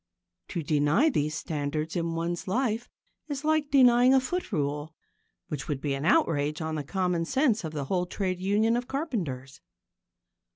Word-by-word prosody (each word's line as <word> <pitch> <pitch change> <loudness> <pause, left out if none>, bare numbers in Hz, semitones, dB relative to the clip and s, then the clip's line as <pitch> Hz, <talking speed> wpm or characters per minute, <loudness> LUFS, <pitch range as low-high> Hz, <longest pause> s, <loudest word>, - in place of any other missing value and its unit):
To 170 - -4
deny 150 - +3
these 150 - 0
standards 155 0 -3
in 165 -1 -1
one's 170 +2 -3
life 235 +2 -1 0.4
is 290 -1 -4
like 310 -2 +2
denying 255 -1 +6
a - - +6
foot 355 +6 -3
rule 150 -1 -2 0.5
which 145 -3 -5
would 145 -3 -2
be 140 0 -2
an 135 +2 -3
outrage 150 -2 +2
on 160 -1 -3
the 155 -2 -2
common 180 +1 -1
sense 245 - +1
of 160 - -4
the 145 -3 -3
whole 180 +4 -1
trade 185 -1 -2
union 210 +4 +2
of 245 0 -2
carpenters. 170 - -4
175 Hz, 165 wpm, -28 LUFS, 150-245 Hz, 0.5 s, denying